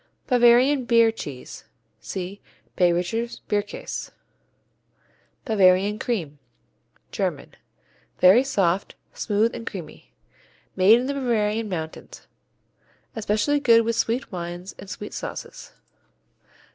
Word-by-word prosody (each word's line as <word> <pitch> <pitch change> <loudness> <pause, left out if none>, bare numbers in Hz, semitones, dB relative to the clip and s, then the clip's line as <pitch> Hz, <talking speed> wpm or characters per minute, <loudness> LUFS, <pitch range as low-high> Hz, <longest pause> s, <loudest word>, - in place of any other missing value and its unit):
Bavarian 250 +2 +4
Beer 230 -1 +4
cheese 145 - -9 0.3
see 190 +2 -6 0.3
Bayrischer 180 +6 0
Bierkäse. 205 0 -3 1.4
Bavarian 200 -2 +3
Cream 165 - -3 0.7
German - - -3 0.6
Very 190 +8 +6
soft; 195 -8 0 0.2
smooth 215 +2 0
and 230 -1 -8
creamy. 170 - -8 0.6
Made 200 +5 +6
in 250 - -3
the 280 - -2
Bavarian 225 -5 0
mountains. 160 -4 -7 0.9
Especially 220 +6 0
good 230 -4 +5
with 230 0 0
sweet 230 +4 -1
wines 175 +1 -6
and 195 - -10
sweet 210 +2 -7
sauces. - - -7
210 Hz, 95 wpm, -24 LUFS, 185-235 Hz, 1.4 s, Very